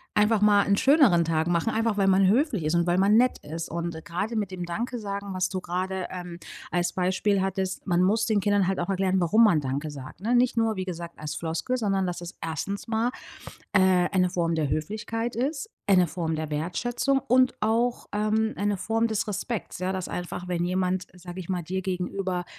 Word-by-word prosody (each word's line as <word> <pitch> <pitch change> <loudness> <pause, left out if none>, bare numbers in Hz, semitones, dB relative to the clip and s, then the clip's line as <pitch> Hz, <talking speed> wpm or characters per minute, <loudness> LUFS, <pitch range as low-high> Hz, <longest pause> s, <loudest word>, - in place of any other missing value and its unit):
einfach 210 0 +3
mal 205 -1 +5
'nen 200 0 +3
schöneren 265 - +5
Tag 160 0 0
machen, 175 +5 +1
einfach 225 -1 0
weil 195 -1 +3
man 195 0 +5
höflich 235 - +2
ist 155 +3 +1
und 170 0 +2
weil 175 +1 +2
man 200 +2 +4
nett 250 +2 +3
ist. 165 +2 -6
Und 170 -1 -4
gerade 195 +7 -3
mit 205 -3 -1
dem 180 -1 -5
Danke-Sagen, 200 0 -4
was 185 0 0
du 185 -1 -3
gerade, 185 +1 -3
ähm, 180 -2 -7 0.3
als 175 0 0
Beispiel 190 +2 +1
hattest, 190 0 -2
man 175 -1 +3
muss 215 +4 +2
den 215 -3 +2
Kindern 205 -1 +2
halt 190 0 0
auch 175 - -2
erklären, 190 -1 +1
warum 215 +7 +4
man 170 -8 +4
„danke“ 140 +3 -3
sagt 140 +3 -10
ne? 235 +5 +1
Nicht 245 0 +3
nur 225 -1 +2
wie 185 - -2
gesagt, 170 -2 -6
als 150 0 -4
Floskel, 165 +10 -2
sondern 195 -5 0
dass 175 -1 -4
es 175 0 -8
erstens 180 +5 -4
mal, 225 +1 +1 0.6
äh, 185 -2 +4
eine 180 -2 +2
Form 170 -2 0
der 155 -3 0
Höflichkeit 215 - -3
ist, 280 - -2 0.2
eine 185 -3 +5
Form 160 0 -2
der 155 -1 -4
Wertschätzung 235 - 0
und 255 0 +3
auch, 230 +3 +1
ähm, 215 +1 +1
eine 205 0 0
Form 225 +4 0
des 220 -2 -1
Respekts, 210 0 -4
ja, 185 +1 -1
dass 185 -1 -3
einfach, 180 0 -5
wenn 175 -1 -1
jemand, 185 0 -1
sage 180 0 -9
ich 180 - -8
mal, 180 -2 -1
dir 190 +3 -3
gegenüber, 185 0 -2
190 Hz, 205 wpm, -26 LUFS, 175-215 Hz, 0.6 s, mal